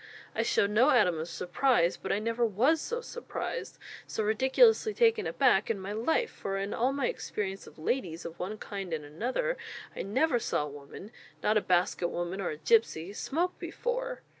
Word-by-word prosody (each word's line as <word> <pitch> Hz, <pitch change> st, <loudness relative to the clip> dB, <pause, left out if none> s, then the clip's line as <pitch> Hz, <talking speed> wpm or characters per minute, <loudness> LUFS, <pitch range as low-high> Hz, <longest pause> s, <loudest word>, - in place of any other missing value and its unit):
I -, -, 0 dB
showed 200 Hz, -, +2 dB
no 235 Hz, +7 st, +5 dB
atom 190 Hz, -, +4 dB
of 160 Hz, +2 st, -4 dB
surprise, 175 Hz, +2 st, +2 dB
but -, -, -5 dB
I -, -, +2 dB
never 230 Hz, +3 st, -1 dB
was 245 Hz, -, +3 dB
so 475 Hz, +1 st, -3 dB
surprised, 475 Hz, +1 st, -5 dB, 0.3 s
so 220 Hz, -, -2 dB
ridiculously 265 Hz, -, +4 dB
taken 460 Hz, -2 st, +3 dB
aback, -, -, +3 dB
in 220 Hz, -3 st, 0 dB
my 190 Hz, +1 st, -5 dB
life; 320 Hz, -, +1 dB
for 195 Hz, 0 st, -4 dB
in 195 Hz, +1 st, -2 dB
all 250 Hz, +3 st, +1 dB
my 275 Hz, -2 st, -1 dB
experience 195 Hz, -2 st, -4 dB
of -, -, -14 dB
'ladies' 170 Hz, -1 st, -2 dB
of 170 Hz, 0 st, -8 dB
one 200 Hz, +4 st, -4 dB
kind 195 Hz, -5 st, -6 dB
and 150 Hz, -2 st, -3 dB
another, 255 Hz, -, -2 dB, 0.4 s
I -, -, -3 dB
never 245 Hz, +6 st, +1 dB
saw 150 Hz, -, 0 dB
a -, -, -4 dB
woman 145 Hz, +9 st, -10 dB, 0.3 s
not 210 Hz, -, +3 dB
a 215 Hz, -, +4 dB
basket 180 Hz, -1 st, +1 dB
woman 175 Hz, +3 st, -3 dB
or 185 Hz, -, -1 dB
a 150 Hz, -, -4 dB
gipsy 195 Hz, -1 st, +2 dB
smoke 340 Hz, +11 st, -2 dB
before!" -, -, -3 dB
215 Hz, 190 wpm, -30 LUFS, 180-275 Hz, 0.4 s, no